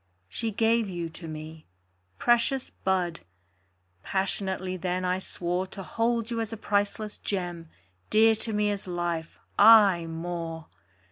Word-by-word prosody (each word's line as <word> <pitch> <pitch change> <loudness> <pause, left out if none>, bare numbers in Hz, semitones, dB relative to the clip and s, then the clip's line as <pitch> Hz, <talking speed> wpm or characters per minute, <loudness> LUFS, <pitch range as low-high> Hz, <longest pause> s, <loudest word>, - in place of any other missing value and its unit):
She 225 - -3
gave 225 0 +2
you 170 -2 -4
to 165 0 -9
me. 155 0 -8 0.5
Precious 240 +2 +2
bud! 180 -3 -1 0.8
Passionately 190 - -1
then 185 +1 -2
I 180 +1 +1
swore 180 0 -2
To 195 +1 -8
hold 230 +2 -1
you 230 -1 -1
as 225 -1 -3
a 225 - -5
priceless 205 +1 -1
gem, 175 -4 -4 0.4
Dear 225 +1 +6
to 220 +1 -4
me 210 -1 +1
as 200 -2 -4
life 175 -2 -3 0.2
aye 200 -5 +7
more! 165 -1 -5
190 Hz, 135 wpm, -27 LUFS, 175-220 Hz, 0.8 s, aye